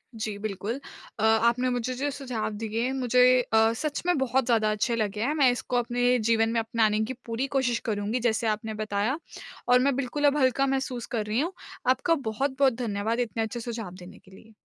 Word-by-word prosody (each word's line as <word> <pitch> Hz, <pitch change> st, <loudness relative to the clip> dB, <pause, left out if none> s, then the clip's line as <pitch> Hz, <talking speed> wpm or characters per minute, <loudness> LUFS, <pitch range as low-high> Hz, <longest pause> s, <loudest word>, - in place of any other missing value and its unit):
जी 215 Hz, -2 st, -4 dB
बिल्कुल। 210 Hz, +4 st, -4 dB, 0.4 s
अ, -, -, -1 dB
आपने 235 Hz, +3 st, +3 dB
मुझे 245 Hz, 0 st, -2 dB
जो 280 Hz, +3 st, -1 dB
सुझाव 255 Hz, -6 st, -3 dB
दिए 220 Hz, +1 st, -3 dB
हैं 260 Hz, -, -1 dB
मुझे 250 Hz, -2 st, +1 dB, 0.2 s
अ, 225 Hz, -2 st, +3 dB
सच 295 Hz, +4 st, -3 dB
में 355 Hz, -2 st, +2 dB
बहुत 265 Hz, -1 st, +1 dB
ज़्यादा 225 Hz, -3 st, +2 dB
अच्छे 215 Hz, +3 st, 0 dB
लगे 210 Hz, -2 st, -2 dB
हैं। 280 Hz, +5 st, +1 dB
मैं 285 Hz, -4 st, +4 dB
इसको 245 Hz, 0 st, -2 dB
अपने 245 Hz, +1 st, +2 dB
जीवन 225 Hz, -1 st, +3 dB
में 230 Hz, -, +1 dB
अपनाने 225 Hz, -2 st, +1 dB
की 260 Hz, -, -4 dB
पूरी 235 Hz, +3 st, -2 dB
कोशिश 245 Hz, -3 st, +1 dB
करुँगी 215 Hz, +2 st, -1 dB
जैसे 230 Hz, -1 st, 0 dB
आपने 220 Hz, +1 st, -2 dB
बताया। 215 Hz, +6 st, -1 dB, 0.5 s
और 250 Hz, 0 st, +6 dB
मैं 270 Hz, +1 st, +2 dB
बिल्कुल 275 Hz, +2 st, -1 dB
अब 290 Hz, +1 st, +2 dB
हल्का 265 Hz, 0 st, +3 dB
महसूस 265 Hz, -3 st, -2 dB
कर 215 Hz, -2 st, -1 dB
रही 215 Hz, +3 st, 0 dB
हूँ। 335 Hz, +6 st, -1 dB, 0.4 s
आपका 260 Hz, +6 st, +3 dB, 0.2 s
बहुत-बहुत 265 Hz, +3 st, +1 dB
धन्यवाद 225 Hz, -1 st, -2 dB
इतने 230 Hz, -2 st, -1 dB
अच्छे 220 Hz, +2 st, -4 dB
सुझाव 225 Hz, -5 st, -5 dB
देने 180 Hz, 0 st, -12 dB
के 190 Hz, -, -21 dB
लिए। 220 Hz, +4 st, -16 dB
235 Hz, 200 wpm, -27 LUFS, 220-255 Hz, 0.5 s, और